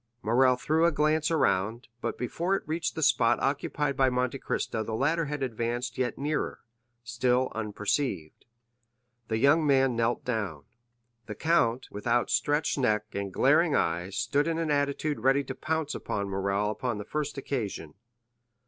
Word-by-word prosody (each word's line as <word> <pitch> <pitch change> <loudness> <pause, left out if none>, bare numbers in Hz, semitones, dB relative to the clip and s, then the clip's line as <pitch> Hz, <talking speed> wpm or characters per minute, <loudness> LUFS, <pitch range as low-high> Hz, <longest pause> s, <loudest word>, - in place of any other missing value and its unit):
Morrel 125 +4 +4
threw 160 +6 +2
a - - +2
glance 155 +1 +1
around, 115 - +1
but - - -3
before 170 +10 -1
it - - -3
reached 160 +1 -2
the 160 - -2
spot 125 -5 +3
occupied 140 0 -1
by 135 -1 +3
Monte 125 +1 -1
Cristo 110 - -2
the 110 0 -3
latter 155 +7 +1
had 145 -1 -3
advanced 120 0 -2
yet 125 -1 -1
nearer, 150 +2 -2 0.4
still 125 +2 +1
unperceived. 105 - -2 0.8
The 110 - -1
young 140 +7 +4
man 135 -3 +3
knelt 115 +1 0
down. 100 - -3 0.6
The 105 - -6
count, 130 -6 +1
with 105 +3 -7
outstretched 145 +5 +1
neck 110 -4 0
and 100 -1 -3
glaring - - +3
eyes, 90 +4 -1
stood 140 +6 +1
in 165 -1 0
an 165 -2 -1
attitude 145 0 0
ready 135 +4 +3
to - - -5
pounce 160 -2 -2
upon 100 -1 -3
Morrel 100 +2 0
upon 120 0 -3
the 105 - -6
first 150 +1 -3
occasion. 110 - -4
125 Hz, 155 wpm, -28 LUFS, 110-145 Hz, 0.8 s, Morrel